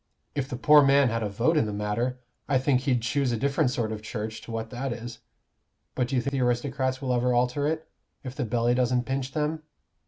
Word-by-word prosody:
If 135 -2 -2
the - - -3
poor 150 +4 +7
man 140 -1 +5
had 115 0 -1
a 105 - -1
vote 120 +11 +1
in 115 - +2
the - - -3
matter, 105 +5 -1 0.3
I 140 - +4
think 130 -1 +2
he'd 125 -4 +1
choose 135 +2 +1
a 120 - 0
different 140 +3 +1
sort 115 -3 -2
of 110 -1 -5
Church 110 0 -5
to - - -10
what 115 0 -4
that 130 +1 -3
is. 115 0 -6 0.7
But 125 - 0
do 135 - -2
you 125 - +1
think 140 - -2
the 135 -2 -1
aristocrats 130 +2 0
will 130 -1 0
ever 125 0 +2
alter 125 +4 +1
it, 160 +1 -2 0.4
if 130 -2 -6
the 140 - -3
belly 120 +1 +1
doesn't 125 0 +1
pinch 135 0 -3
them? 155 +1 -1
125 Hz, 230 wpm, -27 LUFS, 115-135 Hz, 0.7 s, poor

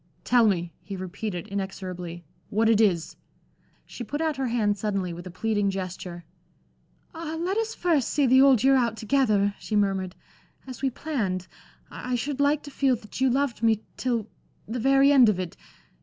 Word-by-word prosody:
"Tell 240 -2 +4
me," 175 -4 0
he 200 - -7
repeated, 185 0 -5
inexorably, 185 -3 -5 0.2
"what 220 +2 +2
it 225 -1 +4
is." 180 -7 +1 0.7
She 245 - -8
put 285 +7 -4
out 315 -3 0
her 265 -1 -1
hand 220 -4 +1
suddenly 195 -4 -2
with 175 +2 -8
a - - -6
pleading 205 +2 0
gesture. 185 -2 -5 0.9
"Ah, 325 -1 -5
let 365 +4 -1
us 450 0 -1
first 320 -8 +1
see 290 - +2
the 260 +1 +6
Old 270 -5 +5
Year 270 0 +5
out 235 -4 +1
together," 215 -4 +2
she 215 - -4
murmured, 195 -3 0 0.5
"as 255 -2 -9
we 270 - +2
planned. 220 - -3 0.5
I 250 0 -3
should 275 +3 -3
like 285 +1 +2
to 285 - -9
feel 270 -2 +2
that 215 +2 -9
you 265 - +4
loved 270 -1 0
me 225 -2 +2
till 235 -4 -1 0.4
the 235 +4 -3
very 275 +3 +5
end 260 -5 +7
of 195 -3 0
it. 180 -2 -4
225 Hz, 180 wpm, -26 LUFS, 195-270 Hz, 0.9 s, end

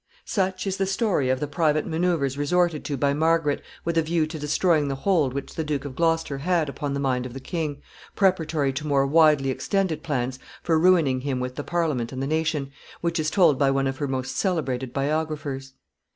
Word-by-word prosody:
] - - -35
Such 190 -1 -1
is 195 -1 -2
the 195 - 0
story 195 - +1
of 130 0 +1
the 150 - -1
private 155 -1 +1
manoeuvres 160 -5 0
resorted 165 +3 +1
to 145 - -2
by 140 +1 +2
Margaret 160 -1 +1 0.2
with 165 0 +1
a - - +4
view 160 0 +1
to 155 0 -7
destroying 150 +1 +2
the 135 - -2
hold 155 -2 +1
which 140 +1 -5
the 160 - -2
Duke 150 -2 -2
of 135 -2 -6
Gloucester 165 -4 0
had 165 0 +1
upon 140 0 -3
the - - -2
mind 130 -2 0
of 125 - -11
the - - -5
king, 145 0 -4 0.3
preparatory 160 -8 +1
to 150 +3 -4
more 140 -2 +3
widely 150 -2 +4
extended 185 +1 -1
plans 130 -4 -2 0.2
for 165 -2 +2
ruining 160 -7 +4
him 135 -2 -2
with 125 0 -3
the 145 - -5
Parliament 155 -9 -1
and 130 - -5
the 135 - -1
nation, 155 -2 -1 0.3
which 170 0 0
is 155 -1 +1
told 165 -8 +4
by 140 -2 +4
one 135 0 +1
of 135 0 -2
her 145 - -1
most 130 -1 -3
celebrated 135 - -1
biographers. 140 -1 -2
150 Hz, 210 wpm, -25 LUFS, 135-165 Hz, 0.3 s, a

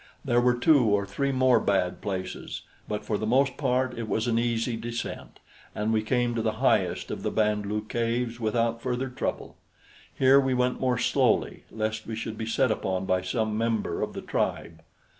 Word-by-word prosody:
There 120 -2 +3
were 125 0 +3
two 125 +1 +4
or 100 -2 +2
three 140 +7 -1
more 130 -2 +4
bad 90 -4 0
places, 95 -2 -5 0.2
but 105 - -4
for 105 - -1
the 110 - -2
most 130 +3 +3
part 130 -2 0
it 110 -2 -4
was 110 - 0
an 115 -1 +1
easy 115 0 0
descent, 115 +1 -6 0.4
and 105 +1 0
we 110 - +2
came 120 +2 0
to 115 - -1
the 110 -1 0
highest 110 - +1
of - - -4
the - - -1
Band 105 -1 0
lu 105 +1 -2
caves 115 +1 -1
without 115 +1 0
further 125 +1 -2
trouble. 125 - -4 0.5
Here 135 +1 +5
we 135 -2 +1
went 125 0 0
more 125 -2 +1
slowly, 120 - +1
lest 110 0 -3
we 110 - -4
should 110 0 -5
be 110 0 -5
set 125 +2 +2
upon 95 -3 -1
by 95 -1 +1
some 110 +3 -1
member 115 0 -1
of - - -2
the - - -6
tribe. 80 -1 -2
115 Hz, 195 wpm, -27 LUFS, 110-125 Hz, 0.5 s, Here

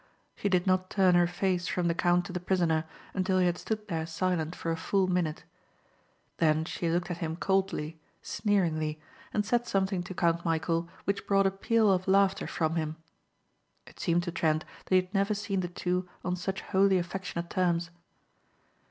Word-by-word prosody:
She 205 - -1
did 180 -2 +2
not 185 -1 +2
turn 190 -2 +4
her 175 0 +5
face 175 0 -1
from 180 -1 0
the 170 - +2
count 175 +1 +2
to 180 - -7
the 180 - -2
prisoner 170 -3 +1 0.3
until 185 0 +1
he 185 - +4
had 175 0 +1
stood 215 -1 -3
there 160 -4 -2
silent 165 -1 -1
for 165 - -3
a - - 0
full 190 +4 +1
minute. 180 -4 -1 0.9
Then 155 -1 +2
she 170 0 -2
looked 175 +2 0
at 170 - -4
him 160 -2 -2
coldly, 180 -4 -1 0.2
sneeringly, 160 -7 0 0.3
and 210 -1 0
said 240 +2 +1
something 190 -1 0
to 180 +1 -7
Count 170 -1 +1
Michæl 165 0 0 0.2
which 200 0 -2
brought 195 -1 +4
a 195 - +3
peal 215 +2 +2
of 185 0 +1
laughter 195 0 +3
from 165 0 -1
him. 155 -1 -2 0.9
It - - -16
seemed 170 +1 +1
to 175 - -3
Trent 155 -2 +1 0.2
that 185 - +2
he 185 - +6
had 185 +2 -20
never 200 +1 +2
seen 200 -1 -2
the 180 - -1
two 180 +1 -2 0.2
on 180 0 0
such 190 +2 -3
wholly 195 0 +3
affectionate 175 -1 -4
terms. 175 -2 +1
180 Hz, 185 wpm, -29 LUFS, 170-190 Hz, 0.9 s, he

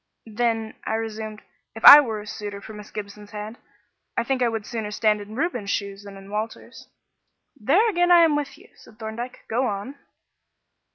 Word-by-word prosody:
"Then," 225 0 -1
I 220 - -2
resumed, 220 -1 -5 0.3
"if 225 - -3
I 290 - +13
were 225 -7 -1
a - - -11
suitor 205 -1 -6
for 215 +2 -11
Miss 210 -1 -11
Gibson's 205 0 -8
hand, 215 +2 -8 0.6
I 235 - +2
think 260 +1 -1
I 245 - +4
would 225 -2 -4
sooner 220 -3 -4
stand 210 0 +1
in 210 +2 -10
Reuben's 245 - -2
shoes 200 0 -3
than 200 -1 -10
in 195 +1 -13
Walter's." 215 +2 -6 0.7
"There 290 - +3
again 350 -4 +2
I 350 -1 +7
am 320 -3 +4
with 290 -1 -3
you," 385 +7 -19
said 215 - -19
Thorndyke. 230 +3 -7
"Go 250 +3 0
on." 210 +7 -5
220 Hz, 185 wpm, -24 LUFS, 210-255 Hz, 0.7 s, I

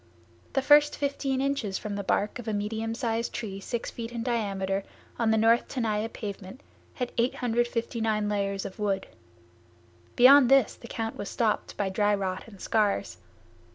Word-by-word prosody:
The 270 - +1
first 295 +1 +5
fifteen 275 -2 -1
inches 275 -8 -1
from 210 -1 -5
the 200 - -3
bark 205 +5 0
of 240 - -8
a 220 - -1
medium 220 +2 -2
size 230 -2 -1
tree 200 -4 -5
six 235 +3 -4
feet 230 0 -6
in 235 -1 -4
diameter, 200 -5 -1 0.4
on 230 -2 +2
the 220 - +3
north 230 +2 +4
Tenaya 225 -4 -1
pavement, 205 +3 -7 0.3
had 250 -2 -3
859 230 -3 0
layers 200 -1 -1
of 190 - -8
wood. 195 -2 0 1.1
Beyond 255 +1 +8
this 270 -4 +5
the 235 - -12
count 225 -1 -4
was 205 - -5
stopped 225 -3 -1
by 200 -2 0
dry 205 +2 +2
rot 190 -2 -3
and 200 -4 -14
scars. 210 -1 0
225 Hz, 160 wpm, -27 LUFS, 205-240 Hz, 1.1 s, Beyond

